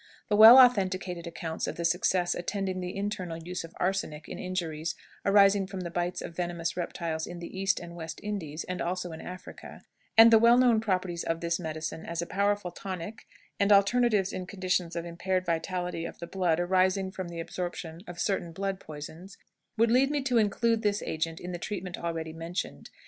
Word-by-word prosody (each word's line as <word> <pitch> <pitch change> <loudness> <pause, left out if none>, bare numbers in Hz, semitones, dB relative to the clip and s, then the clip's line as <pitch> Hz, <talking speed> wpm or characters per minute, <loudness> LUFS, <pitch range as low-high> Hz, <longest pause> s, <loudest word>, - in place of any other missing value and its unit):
The 210 - +3
well 220 +4 +11
authenticated 190 -8 +4
accounts 165 -1 -4
of - - -4
the 170 - -3
success 180 +1 +2
attending 190 +1 -3
the 180 0 -5
internal 190 -4 -3
use 175 +2 -5
of 165 - -11
arsenic 180 -5 -2
in - - -7
injuries 170 -3 -3 0.3
arising 200 -1 +5
from 190 -1 -6
the 170 -1 -5
bites 175 +1 -2
of 165 - -8
venomous 170 -1 -2
reptiles 170 -2 -3
in 175 - -7
the 170 +2 -8
East 195 +1 +1
and 170 0 -9
West 160 -2 -7
Indies, 170 -7 -4
and 180 0 -4
also 180 0 -2
in 160 - -8
Africa, 185 +1 -10 0.3
and 225 +1 +10
the 225 - +8
well 235 +2 +6
known 245 -3 +5
properties 185 -5 -1
of 165 0 -1
this 170 +1 -1
medicine 160 -1 -5
as 170 0 -5
a 170 - 0
powerful 200 -1 0
tonic 190 +3 -7 0.3
and 200 - +3
alterative 205 0 +4
in 185 -1 -5
conditions 180 -3 -1
of 170 0 -3
impaired 185 +2 -2
vitality 175 0 -2
of - - -7
the - - -6
blood 175 -2 0
arising 185 +1 +2
from 185 -1 -5
the 170 -1 -7
absorption 170 -1 -5
of 175 -1 -8
certain 190 -4 -1
blood 195 +2 -3
poisons, 160 +5 -9 0.4
would 230 +1 +4
lead 260 +3 +4
me 295 0 0
to 250 -3 +3
include 225 +2 +2
this 205 -1 0
agent 160 +1 -3
in 180 - -6
the 175 - -5
treatment 185 -2 -4
already 165 -1 -4
mentioned. 165 +3 -5
180 Hz, 190 wpm, -29 LUFS, 170-195 Hz, 0.4 s, well